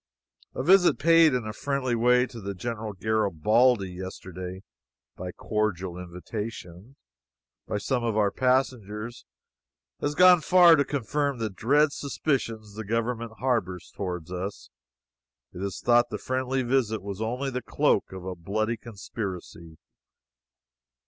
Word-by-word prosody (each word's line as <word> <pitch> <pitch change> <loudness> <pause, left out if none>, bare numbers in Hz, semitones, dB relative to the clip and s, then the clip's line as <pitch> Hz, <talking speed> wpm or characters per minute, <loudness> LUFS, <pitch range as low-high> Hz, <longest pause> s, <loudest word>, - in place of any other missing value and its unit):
A - - -2
visit 180 +3 +5
paid 165 -1 +5
in 125 -3 -2
a 110 - -4
friendly 140 -1 -2
way 125 +2 +4
to 105 -6 -7
General 110 +1 -4
Garibaldi 110 +2 +2
yesterday 95 0 -7 0.5
(by 90 0 -6
cordial 95 -4 -2
invitation,) 90 +4 -7 0.7
by - - -1
some 120 +4 -1
of 115 -2 0
our 105 -2 +3
passengers, 120 -3 -1 0.7
has 145 +1 -2
gone 180 -1 +7
far 175 0 +7
to 145 - +3
confirm 140 +1 -1
the 110 -2 -3
dread 140 +9 +3
suspicions 120 -7 -2
the 110 +2 -6
government 115 +1 -2
harbors 110 -9 -2
toward 90 -4 -4
us. 95 +3 -6 0.8
It 90 - -8
is 100 -2 -4
thought 120 0 +3
the - - -4
friendly 130 0 -1
visit 120 -5 0
was 100 0 -6
only 125 +5 -2
the 125 0 -3
cloak - - +1
of 95 -1 -8
a 95 - -3
bloody 110 +6 -2
conspiracy. 95 -7 -7
110 Hz, 130 wpm, -27 LUFS, 95-130 Hz, 0.8 s, gone